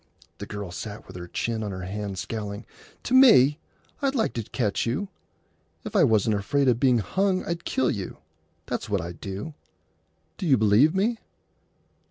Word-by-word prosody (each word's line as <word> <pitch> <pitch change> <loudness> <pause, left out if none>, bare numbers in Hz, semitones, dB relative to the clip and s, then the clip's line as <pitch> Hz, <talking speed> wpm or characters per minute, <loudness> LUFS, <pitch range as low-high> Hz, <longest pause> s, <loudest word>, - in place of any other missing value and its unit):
The - - -6
girl 100 -3 -6
sat 105 +3 -7
with 95 - -13
her 90 -1 -7
chin 115 +5 -2
on 105 - -3
her 95 -1 -6
hand, 100 +1 -5
scowling. 105 +1 -5 0.4
"To 250 - -3
me! 190 - +7 0.4
I'd 275 -1 0
like 225 -4 +1
to 115 - -2
catch 105 -1 -1
you! 145 +12 -2 0.8
If - - -6
I - - +6
wasn't 110 -1 +3
afraid 135 +8 +1
o' 125 - +6
being 125 +1 +3
hung 185 - 0
I'd 170 0 -4
kill 130 -1 +1
you. 100 -3 -5 0.5
That's - - -4
what - - +1
I'd 85 -1 -7
do. 100 +11 -5 0.9
D'you 150 -8 +3
believe 110 - +4
me?" 220 +4 +1
115 Hz, 170 wpm, -26 LUFS, 100-160 Hz, 0.9 s, me